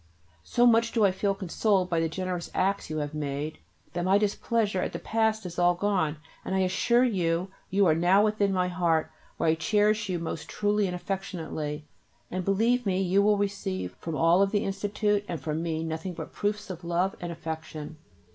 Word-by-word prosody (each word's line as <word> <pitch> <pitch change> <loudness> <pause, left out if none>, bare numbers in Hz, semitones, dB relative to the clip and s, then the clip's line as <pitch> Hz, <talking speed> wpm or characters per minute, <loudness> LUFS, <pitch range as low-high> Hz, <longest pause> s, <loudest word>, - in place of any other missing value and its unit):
So 240 - +2
much 230 -1 +4
do 225 -3 +4
I 195 - +4
feel 195 +1 0
consoled 190 0 +1
by 165 - +2
the 165 0 0
generous 180 0 -3
acts 195 -1 0
you 155 - -3
have 145 -1 -2
made[B] 150 0 -3 0.4
that 175 - -2
my 190 +2 +4
displeasure 210 -1 0
at - - -3
the - - -2
past 220 -1 0
is 175 0 -5
all 175 0 +4
gone, 180 -5 0 0.3
and 190 - -2
I 190 - +2
assure 235 +6 +3
you 180 -5 0 0.2
you 195 +1 +3
are 160 - +5
now 180 +6 +4
within 210 -2 +1
my 180 -1 +1
heart, 170 -3 +1 0.3
where 165 - 0
I - - +5
cherish 210 +5 +1
you 180 - 0
most 165 -2 -5
truly 205 -1 +1
and 180 - -3
affectionately, 165 -5 -4 0.5
and 185 0 -2
believe 225 +6 +2
me 190 -3 0
you 190 +1 +3
will 210 0 +4
receive 95 - -2
from 165 -2 -4
all 165 +4 +4
of 200 - +4
the 205 0 0
Institute 205 +1 0
and 170 -3 -3
from 155 +2 -3
me 165 -1 -2
nothing 160 +3 -4
but - - -7
proofs 205 -1 -2
of 175 -1 -8
love 175 +3 0
and 175 -1 -4
affection. 160 -2 -6
185 Hz, 200 wpm, -28 LUFS, 165-205 Hz, 0.5 s, are